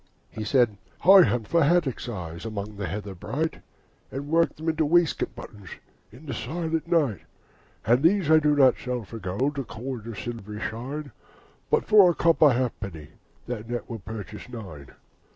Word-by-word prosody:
He 110 - -5
said, 115 -2 +2 0.3
'I 195 +1 +10
hunt 115 -3 -1
for 170 -2 +3
haddocks' 145 -6 +1
eyes 85 -6 -6
Among 105 -1 -5
the 100 -2 -4
heather 100 +2 -5
bright, 150 - -3 0.5
And 140 +2 -5
work 165 +1 +2
them 160 +2 -8
into 160 0 +1
waistcoat 170 +1 +2
buttons 100 -4 -11 0.4
In 130 +8 -14
the 140 - -4
silent 160 +7 -3
night. 150 - +1 0.6
And 120 +4 +4
these 170 -1 +3
I 160 - +8
do 150 -1 +2
not 135 -3 +5
sell 125 -2 -3
for 110 +3 -9
gold 120 +10 -2
Or - - -2
coin 120 0 -7
of 115 -3 -7
silvery 105 -3 -6
shine, 135 +7 -5 0.6
But 455 0 +2
for 205 -4 +7
a 175 - 0
copper 160 -3 +5
halfpenny, 100 - -3 0.4
And 115 -3 -5
that 120 0 -4
will 115 - -5
purchase 105 +2 -8
nine. 90 - -9
125 Hz, 170 wpm, -26 LUFS, 105-155 Hz, 0.6 s, I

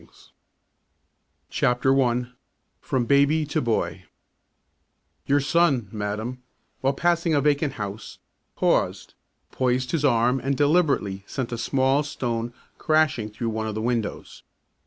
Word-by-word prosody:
Bringing - - -22 1.5
up 125 0 -2
the 135 - +4
Boy 135 -3 +3
I 125 +1 -3 0.5
FROM 125 -2 -1
BABY 140 +4 +3
TO 150 - -1
BOY 115 -2 -1 1.2
Your 140 +1 +4
son, 140 - +2
madam, 110 +4 -4 0.4
while 135 +1 +1
passing 170 +1 +1
a 145 - +3
vacant 145 -1 +1
house, 105 -1 -6 0.4
paused, - - 0 0.4
poised 125 0 0
his 160 -4 -1
arm 125 -1 +3
and 135 +2 -1
deliberately 145 - +2
sent 130 -3 -4
a 120 - -3
small 135 +3 +2
stone 120 -5 -3 0.3
crashing 155 -9 +2
through 115 +2 -4
one 110 0 -3
of 110 - -4
the - - -2
windows. 115 -3 -3
130 Hz, 135 wpm, -24 LUFS, 115-145 Hz, 1.5 s, the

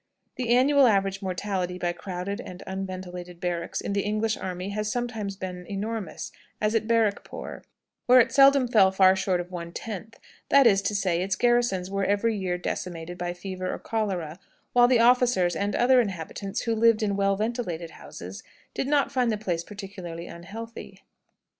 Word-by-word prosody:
The 250 -3 -3
annual 265 +3 +5
average 195 -2 +1
mortality 185 -1 -2
by 175 -1 -1
crowded 185 +4 -5
and 180 -5 -9
unventilated 185 -2 -6
barracks 175 -2 -2
in - - -3
the 200 - +1
English 215 +2 0
army 185 +1 -5
has 210 +1 -2
sometimes 225 -5 -3
been 180 -2 -6
enormous, 210 +1 -4 0.3
as 215 +1 +1
at 220 -1 0
Barrackpore, 225 -3 -1 0.5
where 250 +1 +8
it 235 - +4
seldom 275 -1 +6
fell 205 -5 +5
far 190 0 +5
short 190 -1 0
of 175 +1 -6
one 170 -1 -6
tenth; 220 +3 -7 0.3
that 280 -1 +6
is 195 -4 +5
to 205 +1 -1
say, 185 -4 +1
its 190 0 0
garrisons 240 -6 +1
were 195 0 -1
every 205 +3 +1
year 185 -3 -2
decimated 175 -1 -5
by 175 0 -2
fever 185 0 -4
or - - -4
cholera, 185 -7 -3 0.3
while 245 0 +6
the 245 -2 +4
officers 240 -7 +4
and 200 0 -1
other 250 +1 +5
inhabitants, 195 -1 -4
who 230 - 0
lived 225 0 +4
in 200 -2 0
well 195 0 +2
ventilated 200 -7 -3
houses, - - -9 0.3
did 265 - -2
not 285 -1 +2
find 250 -3 +1
the 215 - -1
place 175 -5 -2
particularly 190 -4 -8
unhealthy. 215 +8 -9
200 Hz, 170 wpm, -26 LUFS, 180-230 Hz, 0.5 s, where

